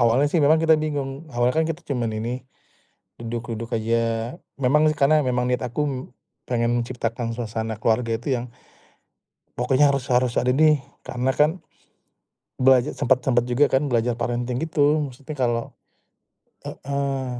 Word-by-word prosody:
awalnya 120 Hz, +4 st, +4 dB
sih 170 Hz, -, +2 dB
memang 150 Hz, +3 st, +5 dB
kita 160 Hz, 0 st, +5 dB
bingung, 145 Hz, 0 st, -4 dB
awalnya 120 Hz, +2 st, +2 dB
kan 160 Hz, -, +1 dB
kita 165 Hz, +1 st, -5 dB
cuman 115 Hz, -4 st, -2 dB
ini, 120 Hz, +4 st, -3 dB, 0.8 s
duduk-duduk 115 Hz, -1 st, -5 dB
aja 115 Hz, +1 st, 0 dB, 0.6 s
memang 140 Hz, +4 st, +3 dB
sih 155 Hz, -, +1 dB
karena 150 Hz, +2 st, +4 dB
memang 125 Hz, -2 st, 0 dB
niat 125 Hz, 0 st, -1 dB
aku 135 Hz, +5 st, -2 dB, 0.6 s
pengen 120 Hz, 0 st, +1 dB
menciptakan 115 Hz, -1 st, -3 dB
suasana 115 Hz, -1 st, -4 dB
keluarga 115 Hz, +1 st, 0 dB
itu 125 Hz, +2 st, -1 dB
yang, 125 Hz, -, -6 dB, 1.1 s
pokoknya 130 Hz, +4 st, +3 dB
harus 140 Hz, -2 st, 0 dB
harus 125 Hz, -1 st, +2 dB
ada 125 Hz, -, +2 dB
nih 150 Hz, 0 st, +3 dB, 0.2 s
karena 125 Hz, +1 st, -2 dB
kan 150 Hz, +3 st, +3 dB, 1.1 s
belaja 130 Hz, +1 st, +3 dB
sempet 130 Hz, 0 st, +2 dB
sempet 120 Hz, -1 st, +1 dB
juga 125 Hz, +4 st, +2 dB
kan 135 Hz, +2 st, +1 dB
belajar 120 Hz, 0 st, +1 dB
parenting 120 Hz, +1 st, -2 dB
gitu 150 Hz, -1 st, +2 dB
maksudnya 145 Hz, +4 st, -9 dB
kalau 120 Hz, -2 st, -1 dB, 0.9 s
heeh, 140 Hz, -1 st, -3 dB
125 Hz, 145 wpm, -23 LUFS, 120-140 Hz, 1.1 s, memang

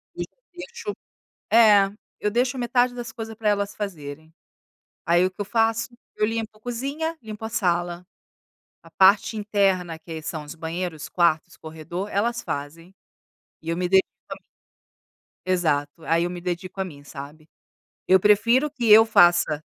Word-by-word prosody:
eu -, -, -3 dB, 0.3 s
deixo 460 Hz, +2 st, -7 dB, 0.6 s
É, 210 Hz, -3 st, +6 dB, 0.3 s
eu 210 Hz, -, 0 dB
deixo 250 Hz, +4 st, 0 dB
metade 245 Hz, +1 st, +1 dB
das 240 Hz, -2 st, -7 dB
coisas 225 Hz, -1 st, -7 dB
para 215 Hz, -1 st, 0 dB
elas 200 Hz, -1 st, 0 dB
fazerem. 160 Hz, -6 st, -7 dB, 0.8 s
Aí, 175 Hz, +2 st, +4 dB
o -, -, -2 dB
que 195 Hz, -, -16 dB
eu -, -, 0 dB
faço? 225 Hz, +2 st, 0 dB, 0.3 s
Eu 215 Hz, -, +1 dB
limpo 225 Hz, -1 st, -4 dB
cozinha, 280 Hz, +8 st, -4 dB
limpo 220 Hz, -1 st, -8 dB
a 220 Hz, -, -2 dB
sala. 175 Hz, -3 st, -1 dB, 0.8 s
A 165 Hz, -, -16 dB
parte 195 Hz, +5 st, +4 dB
interna 195 Hz, -5 st, 0 dB
que 160 Hz, -2 st, -8 dB
são 155 Hz, -1 st, -5 dB
os 150 Hz, +3 st, -10 dB
banheiros, 165 Hz, -1 st, -5 dB
quartos, 170 Hz, -3 st, +1 dB
corredor, 160 Hz, +5 st, -6 dB
elas 235 Hz, +4 st, 0 dB
fazem. 165 Hz, +6 st, -6 dB, 0.7 s
E 160 Hz, -, -7 dB
eu 165 Hz, -, -1 dB
me 180 Hz, 0 st, 0 dB
dedico 190 Hz, +1 st, +4 dB, 0.2 s
a -, -, -3 dB
mim. -, -, -19 dB, 1.0 s
Exato, 155 Hz, -6 st, +1 dB
aí 165 Hz, +1 st, +2 dB
eu 175 Hz, -, -1 dB
me 175 Hz, 0 st, -6 dB
dedico 180 Hz, +2 st, -5 dB
a 190 Hz, -, 0 dB
mim, 145 Hz, -5 st, -11 dB
sabe? 145 Hz, +3 st, -11 dB, 0.6 s
Eu 190 Hz, 0 st, +6 dB
prefiro 230 Hz, +8 st, +4 dB
que 245 Hz, -7 st, 0 dB
eu 220 Hz, +1 st, +9 dB
faça 175 Hz, -7 st, +4 dB
190 Hz, 160 wpm, -24 LUFS, 165-225 Hz, 1.0 s, eu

